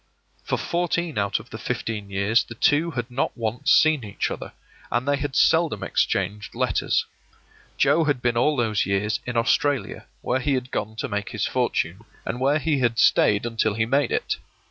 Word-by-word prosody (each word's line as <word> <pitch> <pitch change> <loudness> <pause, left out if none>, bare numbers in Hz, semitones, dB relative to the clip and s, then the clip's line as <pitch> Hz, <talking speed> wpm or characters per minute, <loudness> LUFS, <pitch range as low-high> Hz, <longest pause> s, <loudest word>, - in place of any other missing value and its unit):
For - - -1
fourteen 170 -5 -1
out 100 0 0
of - - -15
the - - -7
fifteen 105 -3 -4
years 100 +4 +2
the 120 - -10
two 150 +8 +2
had 125 -5 -4
not 130 +2 -2
once 120 +7 -1
seen 155 -5 +5
each 100 -2 -3
other, - - -6 0.4
and 120 +4 0
they 145 0 +2
had 140 -1 -4
seldom 160 -11 +3
exchanged 105 0 -1
letters. - - +1 0.7
Joe 155 +4 +3
had 145 -4 +1
been 120 -1 0
all 150 +5 +2
those 110 -4 +1
years 100 +1 0
in 120 -1 -2
Australia, 130 0 0 0.2
where 130 - 0
he 140 +1 0
had 125 0 -4
gone 110 +1 -3
to - - -3
make 105 -1 -3
his - - -2
fortune, 90 +6 -1 0.2
and 120 - -3
where 140 +3 +3
he 155 -2 0
had 120 -2 +1
stayed 105 0 +4
until 110 -2 0
he 110 0 +1
made 140 +5 +1
it. - - -1
120 Hz, 190 wpm, -24 LUFS, 110-145 Hz, 0.7 s, seen